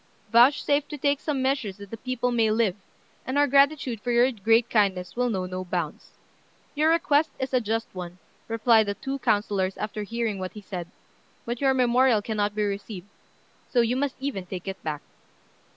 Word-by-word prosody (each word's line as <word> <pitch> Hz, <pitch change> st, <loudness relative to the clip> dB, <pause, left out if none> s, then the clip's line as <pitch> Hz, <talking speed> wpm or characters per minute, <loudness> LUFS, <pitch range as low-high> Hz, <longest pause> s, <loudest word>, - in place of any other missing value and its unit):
Vouchsafe 280 Hz, +4 st, +4 dB
to 295 Hz, -, -7 dB
take 285 Hz, 0 st, +1 dB
some 285 Hz, -4 st, -2 dB
measures 260 Hz, -8 st, -1 dB
that 200 Hz, -1 st, -11 dB
the 225 Hz, -, -5 dB
people 255 Hz, +1 st, -2 dB
may 230 Hz, -2 st, +2 dB
live, 215 Hz, -4 st, +1 dB, 0.5 s
and 260 Hz, +2 st, -3 dB
our 290 Hz, -, +5 dB
gratitude 275 Hz, -4 st, +2 dB
for 245 Hz, -, -4 dB
your 240 Hz, +2 st, +4 dB
great 225 Hz, +1 st, +2 dB
kindness 195 Hz, -6 st, +1 dB
will 245 Hz, 0 st, +1 dB
know 190 Hz, -5 st, -2 dB
no 185 Hz, 0 st, -5 dB
bounds." 175 Hz, -4 st, -5 dB, 0.6 s
"Your 305 Hz, +2 st, +2 dB
request 315 Hz, -2 st, +3 dB
is 260 Hz, 0 st, -4 dB
a 255 Hz, -, +3 dB
just 225 Hz, +1 st, -2 dB
one," 180 Hz, -1 st, -7 dB, 0.3 s
replied 225 Hz, -1 st, +3 dB
the 200 Hz, -, -2 dB
two 270 Hz, +4 st, -4 dB
councillors 205 Hz, -4 st, 0 dB
after 210 Hz, 0 st, -4 dB
hearing 225 Hz, -1 st, -2 dB
what 185 Hz, 0 st, -5 dB
he 210 Hz, -, -9 dB
said; 180 Hz, -3 st, -6 dB, 0.6 s
"but 240 Hz, +2 st, -4 dB
your 270 Hz, -1 st, +3 dB
memorial 250 Hz, -3 st, +3 dB
cannot 210 Hz, -2 st, -1 dB
be 210 Hz, -, 0 dB
received: 200 Hz, -1 st, -5 dB, 0.6 s
so 245 Hz, -, +3 dB
you 235 Hz, +1 st, +1 dB
must 275 Hz, 0 st, -1 dB
even 260 Hz, -10 st, -4 dB
take 185 Hz, 0 st, -7 dB
it 195 Hz, 0 st, -5 dB
back." 150 Hz, -2 st, -4 dB
225 Hz, 185 wpm, -26 LUFS, 200-260 Hz, 0.6 s, our